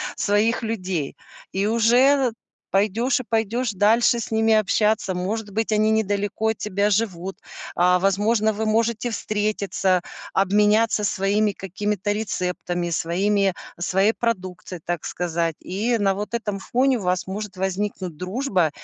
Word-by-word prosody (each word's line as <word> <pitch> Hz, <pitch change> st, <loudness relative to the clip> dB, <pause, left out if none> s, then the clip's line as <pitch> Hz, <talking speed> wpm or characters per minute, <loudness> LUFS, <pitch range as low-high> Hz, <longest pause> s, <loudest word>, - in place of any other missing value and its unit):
своих 215 Hz, +4 st, +1 dB
людей. 185 Hz, -9 st, -3 dB, 0.4 s
И 195 Hz, +2 st, 0 dB
уже, 230 Hz, +2 st, +3 dB, 0.3 s
э, -, -, -9 dB, 0.4 s
пойдешь 215 Hz, +7 st, +2 dB
и -, -, -4 dB
пойдешь 225 Hz, +2 st, 0 dB
дальше 225 Hz, +4 st, +3 dB
с 230 Hz, -, -5 dB
ними 220 Hz, 0 st, +3 dB
общаться. 215 Hz, -2 st, +2 dB
Может 205 Hz, +4 st, -3 dB
быть, 225 Hz, +2 st, -1 dB
они 215 Hz, 0 st, +3 dB
недалеко 205 Hz, 0 st, 0 dB
от 220 Hz, -, -1 dB
тебя 205 Hz, 0 st, 0 dB
живут. 195 Hz, -3 st, -1 dB, 0.4 s
А, 180 Hz, +1 st, +4 dB
возможно, 210 Hz, +3 st, +2 dB
вы 220 Hz, +2 st, -2 dB
можете 230 Hz, +2 st, +1 dB
встретиться, 205 Hz, -4 st, 0 dB, 0.3 s
обменяться 210 Hz, +3 st, +3 dB
своими 205 Hz, +1 st, +1 dB
какими-то 205 Hz, +2 st, -2 dB
рецептами, 180 Hz, -4 st, -2 dB
своими 195 Hz, +4 st, +1 dB, 0.2 s
своей 190 Hz, +5 st, +2 dB
продукцией, 185 Hz, -6 st, -3 dB
так 175 Hz, -2 st, -3 dB
сказать. 170 Hz, -2 st, -2 dB
И 220 Hz, +6 st, -1 dB
на 200 Hz, -2 st, +2 dB
вот 210 Hz, +4 st, -4 dB
этом 210 Hz, -4 st, -3 dB
фоне 255 Hz, +5 st, +1 dB
у -, -, -7 dB
вас 180 Hz, 0 st, 0 dB
может 200 Hz, 0 st, -5 dB
возникнуть 190 Hz, -3 st, -3 dB
дружба, 185 Hz, -, 0 dB
205 Hz, 135 wpm, -23 LUFS, 185-220 Hz, 0.4 s, А